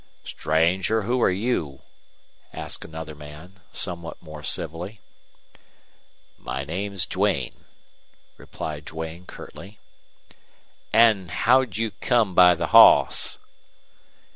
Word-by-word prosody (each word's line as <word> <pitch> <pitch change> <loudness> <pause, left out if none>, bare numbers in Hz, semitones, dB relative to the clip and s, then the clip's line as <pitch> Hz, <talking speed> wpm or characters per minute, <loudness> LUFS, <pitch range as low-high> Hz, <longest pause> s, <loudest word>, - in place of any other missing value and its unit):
"Stranger, 90 +7 0
who 120 +4 0
are - - +4
you?" 90 - -2 0.7
asked - - -6
another 80 -1 -8
man, 75 +6 -13
somewhat 85 -3 -5
more 75 -2 -11
civilly. 85 +8 -2 1.4
"My 65 +2 -5
name's 95 +4 -3
Duane," - - -2 0.7
replied 75 -2 -7
Duane, 80 +3 -7
curtly. 100 +3 -11 1.1
"An' 110 -4 +4
how'd 115 +6 +2
you 115 -1 -1
come 115 -5 0
by 90 0 +7
the - - -3
hoss?" - - +6
90 Hz, 95 wpm, -24 LUFS, 80-105 Hz, 1.4 s, by